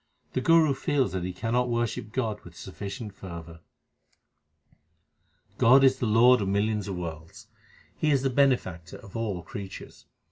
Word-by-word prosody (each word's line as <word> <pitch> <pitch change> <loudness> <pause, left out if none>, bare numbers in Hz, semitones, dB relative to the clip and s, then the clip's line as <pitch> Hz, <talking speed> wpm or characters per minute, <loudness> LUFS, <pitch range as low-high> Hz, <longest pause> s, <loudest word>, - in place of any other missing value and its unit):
The 130 - 0
Guru 160 -1 +4
feels 135 0 0
that 95 -1 -3
he 90 - -3
cannot 120 +6 -1
worship 120 -2 -2
God 110 -4 -2
with 85 -1 -14
sufficient 100 +4 -7
fervour: 85 -4 -9 2.0
God 130 +4 +6
is 130 -1 +4
the 120 - 0
Lord 120 +3 +5
of 100 - -1
millions 105 +1 0
of 95 - -4
worlds; 85 +5 -8 0.5
He 155 - +1
is 140 -3 +2
the 135 - +1
Bene 135 -1 +4
factor 85 -3 -10
of 100 -4 -15
all 105 -6 -3
creatures. 95 +3 -9
110 Hz, 155 wpm, -27 LUFS, 95-125 Hz, 2.0 s, God